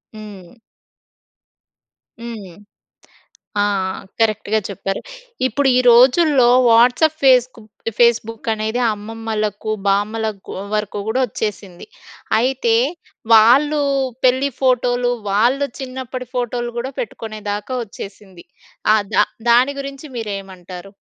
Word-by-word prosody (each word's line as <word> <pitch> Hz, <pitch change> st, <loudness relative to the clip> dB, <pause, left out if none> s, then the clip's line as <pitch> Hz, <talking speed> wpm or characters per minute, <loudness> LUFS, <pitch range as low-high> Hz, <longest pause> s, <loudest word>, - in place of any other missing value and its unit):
హ్మ్. 210 Hz, -1 st, -12 dB, 1.6 s
హ్మ్. 220 Hz, -7 st, -8 dB, 1.1 s
ఆ! -, -, +3 dB, 0.6 s
కరెక్ట్‌గా 220 Hz, -1 st, +1 dB
చెప్పారు. 195 Hz, 0 st, -4 dB, 0.5 s
ఇప్పుడు 275 Hz, +1 st, +1 dB
ఈ -, -, +5 dB
రోజుల్లో 260 Hz, +3 st, +5 dB, 0.2 s
వాట్సాప్, 245 Hz, +7 st, +4 dB
ఫేస్క్ 255 Hz, -2 st, +4 dB
బు -, -, -18 dB, 0.3 s
ఫేస్‌బుక్ 230 Hz, -1 st, +1 dB
అనేది 220 Hz, +3 st, -2 dB
అమ్మమ్మలకు, 215 Hz, 0 st, -4 dB, 0.2 s
బామ్మలకు 210 Hz, +1 st, 0 dB
కూ -, -, -6 dB, 0.2 s
వరకు 210 Hz, -1 st, -2 dB
కూడా 245 Hz, +4 st, 0 dB
వచ్చేసింది. 205 Hz, -, -6 dB, 0.5 s
అయితే 240 Hz, -1 st, +1 dB, 0.6 s
వాళ్ళు 280 Hz, +7 st, +5 dB, 0.4 s
పెళ్లి 260 Hz, +2 st, +3 dB
ఫోటోలు, 245 Hz, -1 st, +1 dB, 0.2 s
వాళ్ళు 245 Hz, +8 st, +2 dB
చిన్నప్పటి 255 Hz, -1 st, -6 dB
ఫోటోలు 240 Hz, -1 st, -2 dB
గూడా 260 Hz, +3 st, -4 dB
పెట్టుకునేదాకా 215 Hz, +1 st, -5 dB
వచ్చేసింది. 195 Hz, -3 st, -11 dB, 0.5 s
ఆహ్, 215 Hz, -1 st, +2 dB
దా -, -, +5 dB, 0.3 s
దాని 255 Hz, +4 st, +4 dB
గురించి 275 Hz, +2 st, -8 dB
మీరేమంటారు? 195 Hz, -3 st, -7 dB
225 Hz, 95 wpm, -19 LUFS, 210-255 Hz, 1.6 s, ఈ